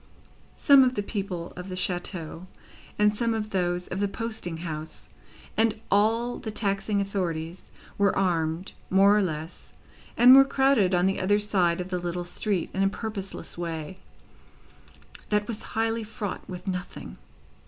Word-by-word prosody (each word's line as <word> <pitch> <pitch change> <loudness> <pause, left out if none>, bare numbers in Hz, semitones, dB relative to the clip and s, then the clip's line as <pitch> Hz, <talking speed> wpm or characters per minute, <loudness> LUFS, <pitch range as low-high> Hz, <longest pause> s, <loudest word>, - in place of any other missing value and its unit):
Some 280 -2 +7
of 255 0 +1
the 205 - -1
people 195 -5 -4
of 180 +2 -7
the 185 - -4
chateau, 180 -1 -3 0.5
and 210 0 +3
some 230 +1 0
of 215 -1 -4
those 180 -1 -1
of 185 - -3
the 205 - +1
posting 210 -5 -4
house, 155 -1 -6 0.5
and 225 -1 +2
all 225 +4 +2
the 220 - -5
taxing 200 -1 0
authorities, 180 -4 -3 0.3
were 200 -1 +3
armed 170 -1 0 0.2
more 195 +2 +5
or 210 - +4
less, 160 -3 -5 0.4
and 250 +2 +9
were 270 - +9
crowded 265 -9 +3
on 175 +1 +3
the 195 0 +1
other 205 +2 +3
side 185 -5 +1
of 180 +1 -5
the 180 - -1
little 175 0 -3
street 185 0 -2
in 190 - -1
a 195 - +4
purposeless 200 -4 -6
way, 165 0 -4 1.3
that 210 0 +1
was 225 -2 -4 0.2
highly 225 0 +1
fraught 215 -2 -6
with 180 -1 -7
nothing. 180 -1 -5
195 Hz, 155 wpm, -26 LUFS, 175-215 Hz, 1.3 s, and